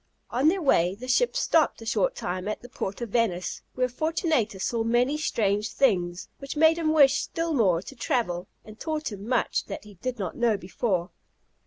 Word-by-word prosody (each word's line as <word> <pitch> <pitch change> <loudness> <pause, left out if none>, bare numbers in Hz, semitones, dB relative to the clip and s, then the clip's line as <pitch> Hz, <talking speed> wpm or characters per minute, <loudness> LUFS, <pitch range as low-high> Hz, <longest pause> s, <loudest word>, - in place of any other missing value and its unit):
On 260 +5 +2
their 365 +2 +2
way 180 - +3
the 250 +5 -9
ship 485 - +2
stopped 325 -10 +2
a 225 - -10
short - - +1
time 185 - -4
at 215 - -4
the 245 - -10
port 195 -2 -5
of 235 - -3
Venice, 190 -6 0
where 255 0 +1
Fortunatus 255 - -1
saw 230 -1 0
many 240 +5 +2
strange 210 -8 0
things, 180 -9 +1
which 275 +2 -6
made 320 +2 +5
him 315 -2 +1
wish 285 -3 +5
still 330 0 -2
more 190 - +2
to 275 - -10
travel, 190 -7 -1 0.2
and 215 0 -13
taught 310 -4 -3
him 205 +1 -8
much 250 -2 0
that - - -7
he 210 -1 -13
did 250 +7 -4
not 190 -5 -4
know 235 -3 +2
before. 185 0 -2
235 Hz, 195 wpm, -26 LUFS, 195-295 Hz, 0.2 s, made